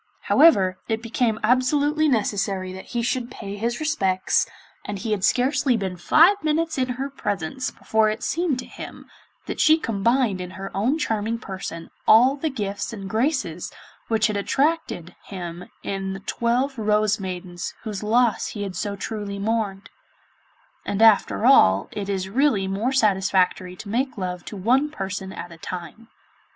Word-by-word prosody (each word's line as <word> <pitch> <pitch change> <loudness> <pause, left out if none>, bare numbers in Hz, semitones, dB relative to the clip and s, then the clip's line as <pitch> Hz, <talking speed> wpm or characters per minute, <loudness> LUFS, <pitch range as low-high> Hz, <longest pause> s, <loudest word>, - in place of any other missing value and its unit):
However, 195 - +4
it 225 0 -2
became 230 -1 0
absolutely 285 +6 +2
necessary 195 -5 -1
that 190 - -9
he 240 -1 -3
should 245 0 -1
pay 200 -4 -7
his 235 +3 -2
respects, 195 -12 +1 0.4
and 205 - -5
he 220 +3 -4
had 205 -3 -1
scarcely 255 +1 +2
been 190 -3 -3
five 330 - +4
minutes 315 0 0
in 255 0 0
her 270 +1 -2
presence 205 - -3
before 220 -1 +1
it 215 - -4
seemed 330 -5 0
to 255 - -6
him - - -10 0.4
that - - -5
she 315 0 +6
combined 230 - +1
in 180 - -6
her 195 +1 -6
own 240 +10 +1
charming 225 -5 -1
person 190 -5 -7 0.2
all 250 +5 +7
the 310 +2 -2
gifts 205 -7 -4
and 195 -3 -7
graces 225 - -1 0.4
which 220 -1 +2
had 210 -2 0
so - - 0
attracted 270 - -1
him 175 -2 -7 0.2
in 195 -1 -3
the 195 - -6
twelve 240 +5 -1
Rose 210 -1 +2
maidens 180 -2 -5
whose 210 -3 -5
loss 230 +2 +2
he 205 - -5
had 195 -2 -5
so 205 -1 -3
truly 205 0 -5
mourned; 205 -1 -2 0.9
and 205 +2 0
after 220 0 +4
all 100 - +5
it 200 -1 -5
is 190 -1 -1
really 220 -3 +2
more 205 +7 -1
satisfactory 190 -5 +2
to 200 - -10
make 250 +4 -1
love 180 -2 -4
to 210 - -7
one 255 +9 +2
person 195 -6 -5
at 175 - -8
a 170 - -11
time. 180 +7 -7
215 Hz, 165 wpm, -23 LUFS, 195-255 Hz, 0.9 s, all